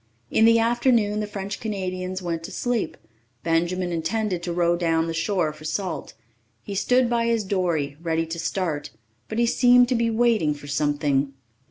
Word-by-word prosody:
In 220 - +4
the 230 0 +6
afternoon 230 -2 +2
the 210 - -2
French 200 0 -5
Canadians 185 -3 -4
went 165 -2 -2
to - - -8
sleep. 245 -3 -2 0.5
Benjamin 175 +2 0
intended 180 +3 -1
to 175 0 -3
row 170 0 +2
down 165 -2 +1
the 165 - -3
shore 165 -1 0
for 155 0 -14
salt. 185 +4 -4 0.5
He 200 - -6
stood 250 +5 +3
by 235 -1 +1
his 230 -2 +1
dory, 170 -8 -1
ready 165 -1 0
to 165 +1 -5
start, 155 -6 -2 0.4
but 220 - -4
he 235 - +3
seemed 245 +1 +5
to 255 - +2
be 230 0 +1
waiting 220 -9 +2
for 145 - -12
something. 145 -1 0
185 Hz, 175 wpm, -24 LUFS, 165-225 Hz, 0.5 s, the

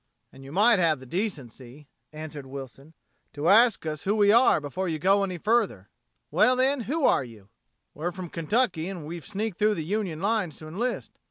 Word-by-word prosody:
"And 135 - -14
you 135 - -11
might 210 +5 +4
have 160 -5 +2
the 130 - -12
decency," 140 - -5 0.2
answered 155 -3 -8
Wilson, 135 +3 -10 0.4
"to 145 +3 0
ask 225 -2 +5
us 155 -2 -4
who 200 +2 0
we 205 -1 +4
are 235 -3 +5
before 170 +6 -4
you 160 - -2
go 195 +5 +3
any 185 -2 -3
further." 200 - 0 0.4
"Well, 255 - +4
then, 260 +1 +1
who 310 -1 0
are - - +3
you?" 110 -5 -14 0.4
"We're 170 +4 -3
from 185 -2 -8
Kentucky 170 0 0
and 175 -6 -7
we've 165 +1 -8
sneaked 210 -1 -4
through 210 0 +3
the 160 - -4
Union 190 -4 -2
lines 200 -4 -1
to 155 - -10
enlist. 235 +10 -4
175 Hz, 190 wpm, -26 LUFS, 150-210 Hz, 0.4 s, ask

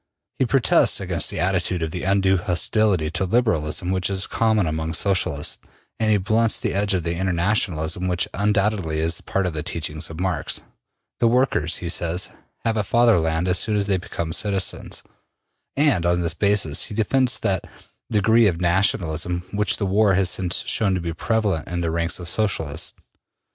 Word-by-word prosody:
He 130 - +2
protests 135 -1 +4
against - - 0
the - - -2
attitude 90 -1 0
of 80 - -4
undue 95 +1 +1
hostility 90 -1 +1
to 90 - -2
Liberalism 90 -6 0
which 95 0 0
is 95 -1 0
common 110 -4 +1
among 80 +1 -2
Socialists, 90 -6 0 0.4
and 110 -1 +1
he 105 - +4
blunts 110 +3 +1
the - - -2
edge 100 0 +1
of 90 - -1
the 85 - -1
Internationalism 90 -2 0
which 90 -1 0
undoubtedly 100 -5 0
is 80 +1 0
part 95 -1 -2
of 90 - -2
the 75 - -2
teachings 80 0 -3
of 80 0 -9
Marx. 90 -5 -1 0.6
The 120 - +3
workers, 115 - +2
he - - -2
says, 85 +1 -1 0.3
have 115 -1 0
a 105 - +1
Fatherland 90 -8 +2
as 90 0 +2
soon 110 - 0
as 100 - +1
they 100 -2 +1
become 85 -3 -5
citizens, 100 0 -2 0.7
and 140 - +3
on 85 0 +1
this 85 -1 0
basis 100 -5 +1
he 105 - -8
defends 125 +4 +2
that 95 -3 -2 0.4
degree 110 +1 +4
of 85 -4 -1
nationalism 90 -1 0
which 105 -1 0
the 100 - -2
war 100 0 +3
has 95 -2 +2
since 95 +4 -1
shown 110 -5 +1
to - - -1
be 85 -1 -4
prevalent 105 -4 -1
in 85 0 -3
the 85 -1 -1
ranks 85 +1 0
of 90 - -7
Socialists. 85 -7 -1
95 Hz, 175 wpm, -22 LUFS, 85-105 Hz, 0.7 s, protests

